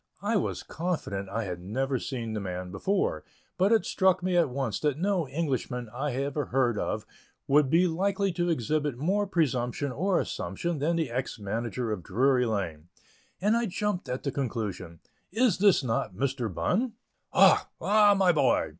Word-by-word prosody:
I 220 +3 +1
was 200 - -1
confident 150 - -3
I 115 +3 -2
had 90 -3 -5
never 130 +7 -1
seen 115 -4 -4
the 110 - -2
man 90 -2 -5
before, 190 - -1 0.3
but 190 +3 +2
it 225 -2 +4
struck 185 -1 +2
me 185 -1 0
at 170 -5 +4
once 125 -5 -2
that 150 -2 0
no 185 -2 0
Englishman 130 -6 -2
I 135 +1 -2
ever 140 +2 -1
heard 120 -4 +1
of - - -2 0.4
would 145 0 +4
be 170 +5 +4
likely 195 +3 0
to 175 0 -1
exhibit 150 -2 0
more 195 +9 0
presumption 140 -5 0
or 180 +7 +1
assumption 140 - -3
than 160 +4 +1
the 160 -7 -1
ex 125 +1 -3
manager 115 +3 -3
of 105 -4 -3
Drury 125 +7 +2
Lane, 85 -8 -3 0.5
and 210 +4 +2
I 235 0 +1
jumped 205 0 -2
at 125 +1 -3
the 140 - -1
conclusion: 105 - -4 0.3
"Is 220 -2 +2 0.2
not 115 -6 -2
this 135 +2 0
Mr. 120 -6 -3
Bunn?" 225 - 0 0.4
"Ah! - - +5
Ah! 205 0 +5
my 190 -2 +5
boy!" 140 -6 +2
140 Hz, 170 wpm, -28 LUFS, 115-180 Hz, 0.5 s, Ah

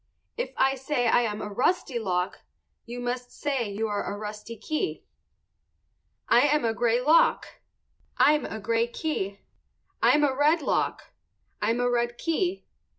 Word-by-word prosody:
If - - -3
I 270 0 +3
say 265 -2 -1
I 240 - +4
am 215 -3 -2
a 210 - -6
rusty 265 - 0
lock 180 -4 -2 0.5
you 240 +1 -6
must 245 0 -4
say 270 -7 -2
you 215 +2 -2
are 205 -1 -2
a 205 - -5
rusty 210 +2 -7
key. 310 - -3 1.2
I - - +5
am 295 -3 +2
a 225 - +1
gray 235 +1 +1
lock. 305 +6 +4 0.7
I'm 300 0 +4
a 220 - -5
gray 230 +2 +1
key. 205 -8 -3 0.6
I'm 295 - +4
a 275 -2 +2
red 300 +3 +3
lock. - - -1 0.5
_I'm 225 +3 +1
a 245 - +2
red 240 0 0
key. 355 +3 -1
245 Hz, 155 wpm, -26 LUFS, 220-295 Hz, 1.2 s, I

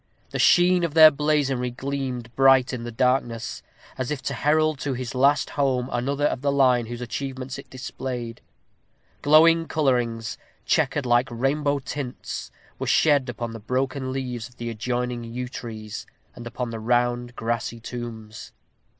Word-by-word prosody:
The - - -3
sheen 180 0 +5
of 165 -2 -2
their 155 -1 +10
blazonry 140 -4 0
gleamed 130 -2 -4
bright 135 0 +5
in 120 -2 -4
the 120 - -5
darkness, 120 -1 0 0.4
as 130 - -2
if 150 - -2
to - - -2
herald 155 0 +2
to 135 -2 -2
his 125 -1 -5
last 135 +1 +3
home 130 -3 0
another 140 +4 0
of 130 - 0
the 140 0 +1
line 125 -4 +3
whose 120 +1 -6
achievements 130 +1 -5
it - - -12
displayed. 125 -2 -6 0.8
Glowing 165 +2 +5
colorings, 120 -7 0 0.3
checkered 145 -3 +1
like 120 +1 +3
rainbow 140 +4 0
tints, 135 -1 -5 0.3
were - - -3
shed 145 -4 +3
upon 120 -1 -4
the 115 - -7
broken 130 +3 -2
leaves 125 -4 -4
of 125 - -24
the 120 0 -4
adjoining 120 +2 -2
yew 120 +2 -5
trees, 110 -4 -7 0.3
and 120 - -8
upon 120 0 -4
the 115 - -5
rounded 120 +1 0
grassy 115 0 -2
tombs. 115 -2 -8
125 Hz, 155 wpm, -24 LUFS, 120-140 Hz, 0.8 s, their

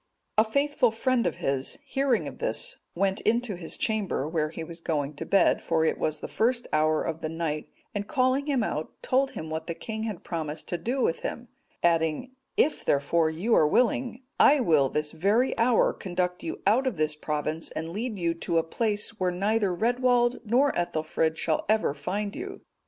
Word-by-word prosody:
A - - +7
faithful 280 +2 +2
friend 235 -1 +1
of 170 - -2
his, 135 - -2
hearing 270 -3 +1
of - - -9
this, - - -2 0.2
went 195 +2 0
into 235 -1 +1
his 170 -2 -5
chamber, 205 - -1
where 155 -1 0
he 165 +1 -6
was 165 +1 -9
going 150 -3 -1
to - - -5
bed, 195 -2 +3
for 160 -1 +1
it - - 0
was 155 -1 -1
the - - -4
first 240 +2 0
hour 155 0 +3
of 165 0 -4
the 155 - -2
night; 160 -2 -3 0.2
and 205 0 -3
calling 260 +1 +1
him 270 -5 +1
out, 155 -7 -3
told 265 +1 +2
him 155 0 -6
what 160 0 -4
the 170 - -3
king 220 +3 -5
had 210 -6 -5
promised 155 -3 -4
to 175 - -2
do 245 +8 -1
with 165 - +1
him, 240 -1 -5 0.3
adding, 165 +8 +1 0.3
"If, 305 - +2
therefore, 160 +3 +2
you 180 +9 -1
are 155 - +5
willing, 245 - +1 0.2
I 290 +1 +7
will 155 - +3
this 150 +1 -2
very 210 +9 +2
hour 230 0 +4
conduct 180 -1 -2
you 165 - -6
out 235 +7 +3
of 235 -9 -1
this 155 0 +1
province, 150 +1 -2
and 160 - -5
lead 215 +5 -3
you 170 -2 0
to 165 0 -2
a 165 - +3
place 210 +4 -1
where 185 -1 +2
neither 200 +3 +1
Redwald 245 +4 +2
nor 255 +6 +3
Ethelfrid 160 -1 -1
shall 160 -1 0
ever 215 -9 +2
find 200 +8 -3
you." 390 +4 -7
190 Hz, 195 wpm, -27 LUFS, 160-240 Hz, 0.3 s, A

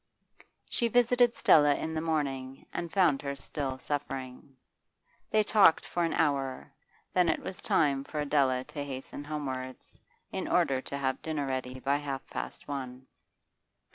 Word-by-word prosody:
She 235 - 0
visited 245 +1 +4
Stella 145 -2 +5
in 160 +2 -3
the 160 - -1
morning, 135 -5 -2
and 170 -1 -4
found 170 -8 +3
her 140 -1 -3
still 140 -1 -4
suffering. 135 -1 -5 0.7
They 215 0 +3
talked 205 -6 +5
for 175 - -1
an 165 - 0
hour, 140 -3 0 0.4
then 180 -2 +4
it - - +1
was 190 - -6
time 140 -3 +2
for 150 - -5
Adela 140 -3 +2
to 145 +2 -6
hasten 135 +1 -6
homewards, 130 -4 -5 0.3
in - - -3
order 130 -1 +2
to 140 - -5
have 130 -1 -1
dinner 155 -3 -2
ready 130 -1 -3
by 140 +2 +1
half 140 -2 -4
past - - -6
one. 130 -2 -5
140 Hz, 150 wpm, -30 LUFS, 130-160 Hz, 0.7 s, Stella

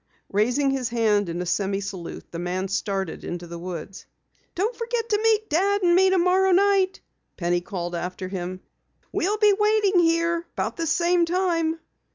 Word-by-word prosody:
Raising 245 +7 +2
his 265 -3 -1
hand 215 -5 +1
in 175 +1 -3
a - - -7
semi 195 +2 0
salute, 190 -4 -7
the 170 - -5
man 185 +2 -2
started 195 -3 -2
into 175 0 -5
the 170 0 -8
woods. 180 +2 -7 0.5
"Don't 425 +7 -1
forget 465 -1 -2
to 420 -1 +1
meet 435 -1 +2
Dad 395 +5 +1
and 345 -1 +4
me 380 +2 +5
tomorrow 375 +1 +3
night," 390 0 +3 0.4
Penny 175 0 0
called 175 -1 -5
after 180 +2 -4
him. 185 -1 -5 0.5
"We'll 410 +4 0
be 420 -1 +5
waiting 420 -2 +3
here 335 0 +1
about - - -2
this 330 -2 -1
same 345 0 +3
time." 335 -2 0
325 Hz, 170 wpm, -24 LUFS, -, 0.5 s, me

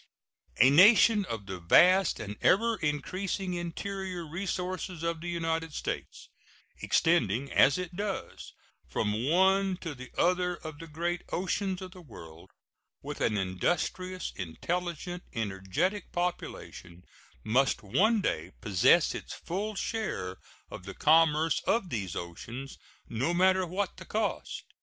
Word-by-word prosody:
A 130 +5 +6
nation 205 +5 +7
of 110 - -5
the 95 -2 -6
vast 180 - +5
and 105 -1 -5
ever 230 +4 +4
increasing 180 +5 -2
interior 180 +1 -4
resources 180 0 -4
of 165 -1 -2
the 175 - -4
United 165 -2 -2
States, - - -5 0.5
extending, 135 - +2
as 135 0 +5
it 180 -1 -5
does, 200 +1 -5 0.4
from 110 +5 -1
one 190 +2 +3
to 165 -4 -4
the 130 -2 -10
other 180 0 +2
of 155 -2 -9
the 165 - -9
great 170 +3 -2
oceans 190 +1 -1
of 185 - -8
the 185 -1 -12
world, 80 - -13 0.5
with - - -6
an 105 - +1
industrious, 175 - -2
intelligent, 175 - -4
energetic 110 - -2
population, 175 - -5 0.4
must 130 +2 +2
one 210 - +3
day 80 - -2
possess 95 +5 +4
its - - -7
full 205 +5 -4
share 180 - -3 0.3
of 90 - -9
the 95 - -8
commerce 160 0 +4
of 220 -5 +1
these 95 -7 -3
oceans, 120 +10 -7 0.3
no 130 +10 -1
matter 185 0 +3
what 190 +3 -3
the - - -10
cost. 220 +1 -2
170 Hz, 130 wpm, -29 LUFS, 125-185 Hz, 0.5 s, nation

